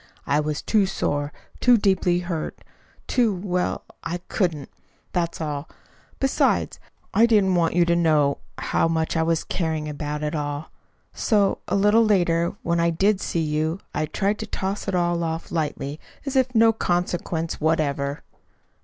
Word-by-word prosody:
I 145 +1 +2
was 150 -1 -2
too 210 -3 +3
sore, 145 -6 -1 0.3
too 245 -1 +6
deeply 185 -3 +2
hurt, 170 -3 -4 0.4
too 235 -6 +2
well, 180 -1 -1 0.2
I 165 +1 -3
couldn't. 165 -8 -1 0.4
That's 170 -2 -1
all. 150 -2 -4 0.5
Besides, 270 -1 +1 0.3
I 230 +2 +5
didn't 205 -5 +4
want 170 -2 +2
you 175 -1 +5
to 170 0 +2
know 155 -4 +3 0.2
how - - +1
much 160 0 0
I 165 - +2
was 165 0 +1
caring 160 -3 -2
about 150 0 -4
it 150 - -2
all. 145 0 -3 0.4
So, 205 -4 +2
a - - 0
little 210 +3 +5
later, 175 -5 +2
when 170 0 +1
I 170 0 +3
did 195 +4 +2
see 170 - -1
you, 155 +3 -1
I 155 - -1
tried 200 +6 -1
to - - -5
toss 195 +2 -3
it 195 - 0
all 175 -1 +1
off 165 0 -4
lightly, 150 -2 -2 0.3
as 275 -1 -3
of 255 -1 +2
no 225 0 +6
consequence 175 -4 -1
whatever." 145 -3 0
170 Hz, 160 wpm, -24 LUFS, 155-195 Hz, 0.5 s, too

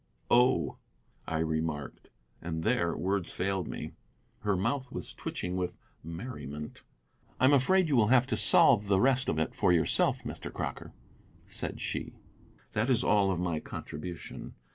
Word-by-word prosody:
"Oh," 120 - +3 0.5
I 80 - -1
remarked, 80 -2 -3 0.3
and 80 -1 -4
there 110 -8 +1
words 95 -1 -1
failed 95 -1 -1
me. - - -6 0.5
Her 100 -2 0
mouth 130 +7 -1
was - - -6
twitching 90 +1 -4
with 90 -1 -3 0.3
merriment. 80 - -7 0.6
"I - - +4
am 140 - +6
afraid 175 +7 +4
you 140 -4 +2
will 110 -3 +5
have 125 +1 +5
to 125 - -1
solve 105 0 +5
the 100 -1 +3
rest 130 +3 +3
of - - 0
it 80 - -1
for - - +2
yourself, 85 -2 +2
Mr. - - -6
Crocker," - - -5 0.5
said - - -5
she; - - -4 0.6
"that 110 +4 0
is 125 -1 +3
all 100 -2 +3
of 90 -3 0
my 85 -3 -1
contribution. 85 +4 -7
95 Hz, 155 wpm, -30 LUFS, 85-125 Hz, 0.6 s, am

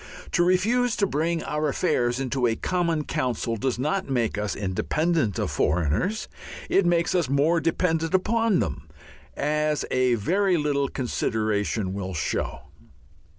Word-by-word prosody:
To 175 - +3
refuse 220 +7 +2
to 200 - +2
bring 165 0 -1
our 150 0 -1
affairs 120 -5 0
into 130 -1 0
a 115 - +1
common 170 +1 0
council 120 -4 -2
does 120 +3 -1
not 150 +7 -1
make 120 -4 0
us 105 -2 -2
independent 115 - 0
of - - -1
foreigners. 90 - 0 0.4
It 195 -3 +4
makes 175 +2 +2
us 175 -7 +1
more 150 +5 +3
dependent 165 +1 0
upon 220 - +2
them, 80 -9 -4 0.5
as 150 0 0
a 130 -1 +3
very 185 - +1
little 145 -2 0
consideration 110 -6 -1
will 95 -2 -4
show. 75 - -2
150 Hz, 140 wpm, -25 LUFS, 115-175 Hz, 0.5 s, It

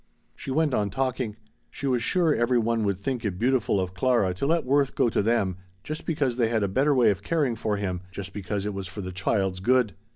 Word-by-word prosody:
She - - -8
went 150 +1 +1
on 105 -3 +1
talking. 125 -1 -2 0.3
She - - -7
was 125 -3 +1
sure 165 +5 +2
every 120 +1 +2
one 115 -1 +1
would 100 -2 0
think 125 +2 -3
it 100 -5 -2
beautiful 120 -3 +1
of 95 -1 -2
Clara 100 -2 +2
to 95 +10 -2
let 165 -1 +2
Worth 140 +1 +2
go 120 - +3
to - - +1
them 100 -4 +1 0.3
just 155 +1 -6
because 145 -7 0
they 115 -3 +2
had 110 -2 +1
a - - +2
better 135 +9 +2
way 120 -4 +5
of 100 0 -4
caring 145 -1 0
for 105 -1 -1
him, 90 -3 -3
just 95 -1 -7
because 100 0 -3
it 105 - -2
was 95 -2 -5
for 100 +3 -7
the 95 -1 -5
child's 95 0 0
good. 125 +1 +2
115 Hz, 235 wpm, -26 LUFS, 100-130 Hz, 0.3 s, way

